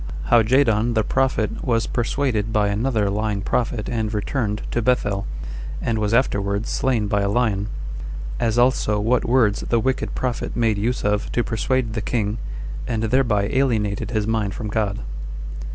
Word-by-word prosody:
How 120 -1 +7
Jadon 115 -1 +3
The 110 - +3
Prophet 130 -3 0
Was 115 -2 +1
Persuaded 120 -3 0
By 105 -2 +2
Another 110 0 +1
Lying 105 -1 -1
Prophet 115 -2 -1
And 110 -3 -1
Returned 105 0 -1
[To 120 - 0
Bethel,] 105 -5 +1 0.5
And 115 -2 -1
Was 105 -1 0
Afterwards 100 -4 +1
Slain 125 -5 +1
By 100 0 +1
A 100 - +1
Lion. 105 -3 +1 0.7
As 115 0 +1
Also 120 -4 +3
What 115 +4 +2
Words 115 -4 +3
The 115 - +3
Wicked 130 +3 -1
Prophet 125 -2 -2
Made 115 -3 +2
Use 120 +5 -1
Of 105 +1 0
To 120 - +2
Persuade 115 +1 0
The 110 - -2
King, 110 -1 -1 0.5
And 115 -1 -1
Thereby 115 -3 +2
Alienated 110 -7 +1
His 110 -3 0
Mind 110 -2 0
From 110 -3 -4
God. 105 - -1
110 Hz, 160 wpm, -22 LUFS, 105-120 Hz, 0.7 s, How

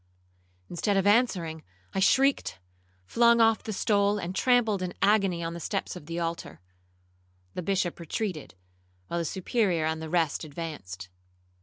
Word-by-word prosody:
Instead 195 +3 0
of 195 - +1
answering, 195 -8 +2 0.3
I - - -1
shrieked, 270 +8 +3 0.5
flung 235 - +4
off 225 -1 +4
the 220 - -5
stole, 205 0 +2
and 185 -2 -4
trampled 225 -3 +2
in 180 -1 -4
agony 195 -4 +2
on 165 0 -3
the 170 - -6
steps 195 +3 -3
of 155 -4 -10
the 170 +1 -3
altar. 165 - -4 0.9
The - - -4
Bishop 185 -1 -1
retreated, 170 - -4 0.5
while 170 - -1
the 170 - -2
Superior 185 -2 0
and 160 0 -1
the 160 - -6
rest 165 -3 +1
advanced. 145 - -7
180 Hz, 150 wpm, -28 LUFS, 165-210 Hz, 0.9 s, flung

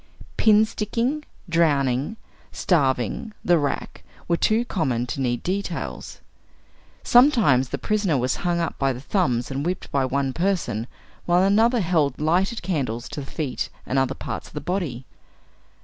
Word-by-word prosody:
Pin 215 0 +5
sticking, 235 +7 -2 0.2
drowning, 145 - +1 0.3
starving, 140 - 0
the 175 -2 +4
rack, 145 -1 -3 0.2
were 170 - +2
too 220 +7 +2
common 130 - -1
to 135 - -4
need 120 -2 -1
details. 185 -1 -4 0.8
Sometimes 220 - +5
the 140 - -2
prisoner 195 - 0
was 125 +1 0
hung 175 -1 0
up 170 - -3
by 135 -1 +2
the 125 - -8
thumbs, 135 - 0
and 135 +1 -2
whipped 180 +3 -3
by 140 -1 +1
one 135 0 -1
person, 170 - -1 0.4
while 175 +1 +4
another 225 +4 +4
held 160 -7 +1
lighted 180 +9 +1
candles 130 -10 -2
to - - -6
the 135 - -9
feet 145 -5 -3 0.2
and 135 - +1
other 135 0 0
parts - - -6
of - - -18
the - - -2
body. 155 -9 -3
160 Hz, 150 wpm, -23 LUFS, 135-195 Hz, 0.8 s, Pin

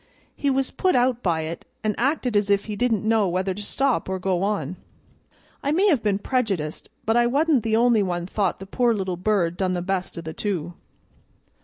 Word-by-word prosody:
He 285 - 0
was 270 -1 0
put 370 - +1
out 245 -1 +2
by 165 -6 +1
it, 160 +2 -5 0.2
an' 215 -1 +1
acted 255 -2 0
as 205 0 +2
if 200 0 +2
he 210 - -4
didn't 220 -2 0
know 220 -3 +3
whether 185 +2 -1
to 205 - -7
stop 265 +2 0
or 190 - -1
go 185 -1 0
on. 185 -5 -1 0.8
I 285 - 0
may 365 +6 +3
have 290 - +3
been 205 -2 +1
prejudiced, 200 - -2 0.2
but 225 - +2
I 240 0 +4
wa'n't 285 +1 +3
the 220 0 0
only 235 -1 +4
one 175 -3 -1
thought 190 0 -1
the 195 - -9
poor 235 +3 +1
little 190 -3 -2
bird 180 -2 0
done 185 -1 0
the 175 - -1
best 185 -1 -2
of 170 - -5
the 160 0 -6
two." 175 -4 -3
205 Hz, 210 wpm, -24 LUFS, 185-240 Hz, 0.8 s, I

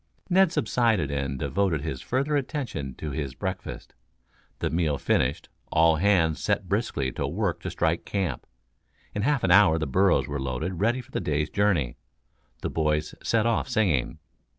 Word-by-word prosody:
Ned 190 -1 +5
subsided 110 - +1
and 70 -1 -2
devoted 95 0 0
his 70 -4 -4
further 140 +4 0
attention 130 - -3
to 75 - -5
his 70 -2 -4
breakfast. 95 +1 -5 0.6
The - - -2
meal 80 -4 +1
finished, - - 0 0.2
all 80 0 +4
hands 85 -4 +3
set - - 0
briskly 65 -2 -1
to - - -3
work 85 +1 -1
to 90 - -4
strike 85 -1 0
camp. 95 -4 -3 0.7
In 105 - -2
half 140 +3 +1
an 95 - +2
hour 95 -4 +6
the 80 - -1
burros 95 +7 +3
were 70 -1 -3
loaded 75 +8 -3
ready 120 +5 +1
for 130 +2 -20
the - - -1
day's 75 0 -1
journey. 95 -12 +1 0.7
The - - -1
boys 75 -1 0
set 115 -1 +1
off 115 -1 +1
singing. 85 - +1
85 Hz, 165 wpm, -26 LUFS, 75-105 Hz, 0.7 s, hour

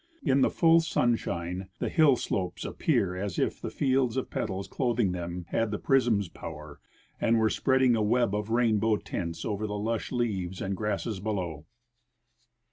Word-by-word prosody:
In 135 +1 +3
the - - +4
full 165 -1 +5
sunshine, 95 - -1
the - - -2
hill 155 -6 +5
slopes 90 -6 -3
appear 90 -2 0
as 95 -1 -4
if - - -1
the - - -3
fields 130 -3 +1
of 130 - -3
petals 95 0 -3
clothing 120 -6 0
them 90 0 -5
had 115 -1 0
the 105 - -2
prism's 120 -8 +2
poAver, 75 -3 -9 0.4
and 115 - +3
Avere 110 -1 +3
spreading 130 -2 +3
a 110 - 0
web 115 0 +2
of 105 0 -2
rainboAV 110 -2 +2
tints 85 -2 -4
over 105 0 -2
the 105 0 -3
lush 110 +2 -2
leaves 95 -7 -2
and 95 0 -2
grasses 105 0 -2
below. 90 -7 -4
105 Hz, 165 wpm, -28 LUFS, 95-120 Hz, 0.4 s, full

